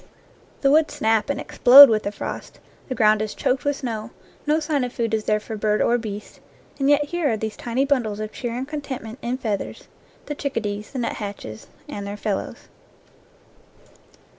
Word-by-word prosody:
The 275 - +4
woods 310 +1 +3
snap 220 +1 +1
and 280 -1 -1
explode 280 -1 +9
with 220 -3 +1
the 200 - -3
frost, - - -7 0.3
the 255 - -2
ground 215 -1 +4
is 215 -1 -3
choked 255 0 0
with 285 0 +1
snow, 225 -5 -5 0.4
no 305 +1 +3
sign 300 -3 0
of 250 - -3
food 230 -2 -2
is 220 -1 0
there 215 0 +2
for 220 +1 -7
bird 210 0 +1
or 240 +1 +2
beast, 210 -2 -7 0.4
and 275 0 +2
yet 290 0 +5
here 345 -6 0
are 220 - 0
these 220 0 -4
tiny 245 +3 -1
bundles 240 -7 0
of 215 0 -4
cheer 240 -2 -4
and 255 +2 -4
con 300 0 -4
tentment 250 -5 -7
in 245 +2 -2
feathers 215 -6 -4 0.4
the 295 - -4
chickadees, 215 -8 -3
the 270 - -6
nut 240 -2 -2
hatches, 200 - -7 0.2
and 200 0 -6
their 205 +1 -5
fellows. 205 -1 -4
230 Hz, 190 wpm, -23 LUFS, 215-275 Hz, 0.4 s, explode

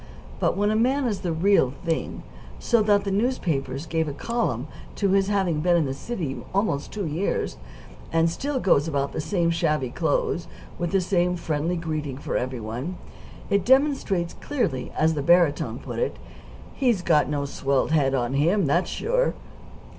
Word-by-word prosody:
But - - +1
when 205 +1 +2
a - - +1
man 260 +5 +2
is 215 -5 -1
the 175 - -2
real 160 -6 +3
thing, 165 -1 -2 0.3
so 235 -2 +2
that 205 -1 +3
the 200 - -2
newspapers 165 - -1
give 160 -1 -1
a 145 - -3
column 150 - -2 0.3
to 200 - +1
his 195 0 +3
having 190 -6 +1
been 175 +2 +3
in 165 - +2
the 135 - -2
city 155 - -4 0.2
almost 195 -8 0
two 205 -3 -3
years, 165 +6 -2 0.5
and 165 0 +3
still 265 - -2
goes 165 - +3
about 140 -3 0
in - - -16
the - - -2
same 170 0 +1
shabby 150 -6 0
clothes, - - 0 0.3
with 175 -1 -1
the 195 -1 +3
same 180 -1 +1
friendly 165 0 -1
greeting 155 -5 -3
for 145 - -4
every 130 0 -2
one, 125 +11 -5 0.5
it 200 -2 +3
demonstrates 260 - +2
clearly, 225 - -2
as 160 +1 +3
the 150 - -2
barytone 170 -1 +3
put - - -6
it, 485 - -1
that - - -17 0.5
"he's 240 -9 +1
got 155 -4 +3
no 145 -1 -1
swelled 140 0 0
head 140 -4 +3
on 120 0 -1
him; 170 +7 +2
that's 170 +6 +1
sure." - - 0
170 Hz, 180 wpm, -25 LUFS, 145-205 Hz, 0.5 s, real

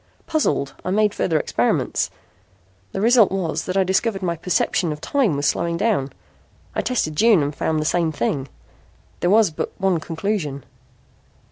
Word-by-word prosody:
Puzzled, 310 - 0
I - - -3
made 210 +2 +2
further 160 -3 +1
experiments. - - 0 0.8
The - - -4
result 230 -1 +5
was 185 -5 -2
that 185 +1 -2
I 190 - +4
discovered 190 +2 0
my 170 -2 0
perception 175 0 0
of 150 - -5
time 235 - +1
was 145 - -1
slowing 170 +4 0
down. 170 -11 0 0.6
I - - 0
tested 155 -12 -1
June 215 -3 +5
and 145 +1 -3
found 160 +1 0
the 155 - -2
same 165 0 +1
thing. 135 0 -2 0.7
There 175 - +1
was 210 -3 +4
but 155 - -4
one 190 -3 +2
conclusion." 160 -4 -3
180 Hz, 160 wpm, -22 LUFS, 155-205 Hz, 0.8 s, result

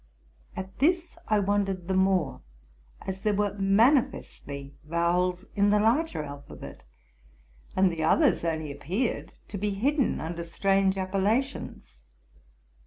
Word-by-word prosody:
At 190 0 -7
this 340 +4 +2
I 215 - +3
wondered 195 -3 0
the 190 - 0
more, 190 - +2 0.6
as 190 0 -5
there 210 -1 +1
were 205 0 0
mani 225 +9 +5
festly 140 -9 -9
vowels 175 +3 0
in 205 0 +3
the 210 0 +4
larger 230 - +1
alphabet; 140 - -10 0.9
and 190 -1 +4
the 160 -1 -3
others 300 - +3
only 160 -3 -2
appeared 180 - -2 0.2
to 200 - -5
be 210 +2 0
hidden 265 +8 +1
under 170 +1 -4
strange 195 +3 +1
appellations. 195 - -2
195 Hz, 125 wpm, -27 LUFS, 170-210 Hz, 0.9 s, mani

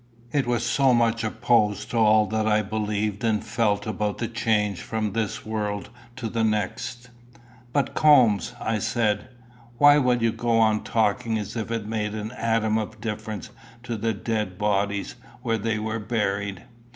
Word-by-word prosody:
It 140 -4 +1
was 120 -1 0
so 130 +1 +3
much 115 -1 +2
opposed 105 -1 +1
to 120 - -1
all 110 -1 +5
that 110 0 -1
I 105 0 +3
believed 105 0 -2
and 110 -2 +1
felt 105 -2 0
about 105 -1 -2
the 115 - -2
change 105 -4 0
from 110 -3 -2
this 110 -3 -2
world 105 -2 -3 0.2
to 125 -3 -4
the 115 0 -1
next! 110 +3 -2 0.6
"But, 140 -1 0
Coombes," 125 - +4
I 110 -1 -1
said, 105 0 0 0.5
"why 145 +1 +7
will 125 -3 +2
you 115 - +3
go 115 0 0
on 110 -1 +3
talking 110 +1 +1
as 105 +1 -5
if 115 -1 -3
it 115 -2 -2
made 105 -1 -2
an 110 +1 -4
atom 115 -3 +1
of 110 0 -6
difference 110 -1 -5 0.3
to 120 -1 -3
the 115 +1 -1
dead 105 -3 -3
bodies 100 +1 -1 0.3
where 115 -3 0
they 110 +1 -1
were 110 +1 -3
buried? 100 -4 -2
110 Hz, 165 wpm, -25 LUFS, 105-115 Hz, 0.6 s, why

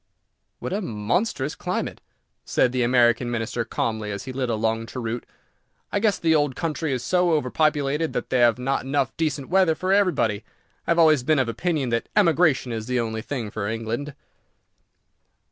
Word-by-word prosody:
"What - - -5
a 205 - -1
monstrous 135 - -1
climate!" - - -4 0.4
said 125 - +2
the 130 0 0
American 120 0 +3
Minister, 115 0 -2
calmly, 110 -1 -2
as 100 -1 -4
he 130 - -7
lit 130 -1 -2
a 115 - +1
long 115 +1 -1
cheroot. 120 -1 -5 0.6
"I 205 - +1
guess 205 -2 +2
the 165 -1 +2
old 145 -4 +2
country 160 -2 -2
is 125 -2 -2
so 180 +1 +2
overpopulated 150 +1 +1
that - - -4
they 130 - +2
have 120 -1 +5
not 135 +2 -1
enough 135 -1 -1
decent 150 -4 -2
weather 185 -3 +3
for 185 +4 0
everybody. 170 - +2 0.4
I - - -5
have 170 - +3
always 155 -4 +5
been 155 +5 +2
of 130 -3 +2
opinion 145 +2 -1
that 115 0 -1
emigration 165 -9 +3
is 110 -1 -4
the 125 0 0
only 110 -1 -2
thing 120 -4 -4
for 110 -3 -3
England." 115 +6 -4
130 Hz, 180 wpm, -24 LUFS, 115-160 Hz, 0.6 s, have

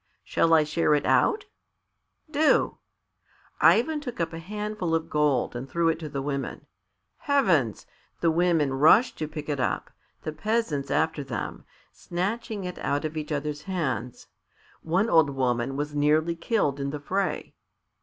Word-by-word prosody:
"Shall 165 - +1
I 155 - +5
share 150 0 +2
it 145 - -1
out?" 430 -3 +3 0.9
"Do." 310 +1 +2 0.8
Ivan 300 +6 +4
took 245 -8 -7
up 165 -1 -1
a 165 - -5
handful 210 -1 -3
of 165 0 -3
gold 145 -5 +1
and 130 +3 -6
threw 170 -1 +2
it 160 - -1
to 155 -2 -6
the 140 -1 -4
women. 140 -1 -4 0.5
Heavens! 180 - +1 0.3
The 165 - +3
women 165 -4 +2
rushed 155 - +5
to 155 - -2
pick 150 -1 -7
it 145 -2 -2
up, - - -1 0.3
the 155 - -3
peasants 155 -5 -1
after 160 -2 0
them, 130 -4 -5 0.3
snatching 205 +4 -3
it 180 -1 -6
out 145 +2 -1
of 155 +1 -4
each 155 0 -4
others' 150 0 -2
hands. 135 -9 -3 0.6
One 185 +7 +1
old 160 -8 +5
woman 130 -1 -1
was 145 +1 -3
nearly 155 +3 +2
killed 165 - 0
in 140 0 -2
the 150 +1 -4
fray. 190 +7 -2
160 Hz, 155 wpm, -26 LUFS, 145-185 Hz, 0.9 s, I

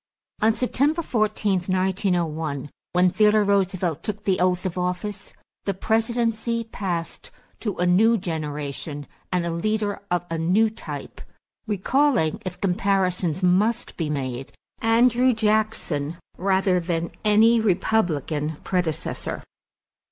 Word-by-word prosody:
= - - -35
On 220 +1 +5
September 285 +7 +1
14, 215 -6 +1
1901, 175 -6 -1 0.2
when 180 +1 +4
Theodore 210 +1 +4
Roosevelt 190 -5 +1
took 210 -1 -5
the 190 -3 +1
oath 180 0 +1
of 185 - -2
office, 180 +3 -3 0.3
the 200 - -1
presidency 230 +2 0
passed 185 -7 -4 0.3
to 210 -4 -3
a 180 - +1
new 220 +6 +4
generation 150 -4 -4 0.3
and 180 -2 0
a 170 - -1
leader 205 +4 -1
of 175 0 0
a 165 - -1
new 200 +7 +3
type 220 - -8 0.5
recalling, 215 - +1
if 185 -3 -6
comparisons 185 -3 0
must 210 +7 +2
be 160 -3 -2
made, 135 -3 -3 0.3
Andrew 240 +2 +4
Jackson 210 -9 0 0.2
rather 190 -1 +2
than 170 -1 -2
any 220 +2 +5
Republican 170 - 0
predecessor. 175 -4 -2
190 Hz, 120 wpm, -24 LUFS, 170-220 Hz, 0.5 s, On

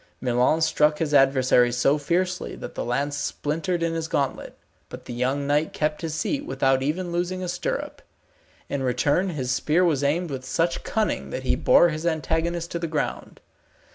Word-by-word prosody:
Milon 125 +6 +2
struck 150 -1 +3
his 150 -2 -2
adversary 130 -3 +4
so 135 +5 +2
fiercely, 180 +5 -1
that - - -8
the - - -4
lance 140 +4 -1
splintered 165 +5 -2
in 165 0 0
his 165 -1 -3
gauntlet; 140 -4 -2 0.3
but - - -10
the - - -6
young 130 +4 -1
knight 145 +2 +1
kept 150 0 -1
his 160 -2 -3
seat 285 - -1
without 135 - +1
even 170 +6 -2
losing 180 +2 -2
a - - -3
stirrup. 175 0 -3 0.7
In 140 - -3
return 145 +9 +1
his 130 -7 -3
spear 155 +6 +2
was 150 -5 +1
aimed 160 +4 0
with 130 -1 -5
such 165 +6 -1
cunning 220 -1 -1
that - - -5
he - - +1
bore 175 - +5
his 155 +1 -3
antagonist 165 +2 -1
to 170 - -2
the 170 - -2
ground. 155 -2 -4
155 Hz, 180 wpm, -24 LUFS, 135-170 Hz, 0.7 s, bore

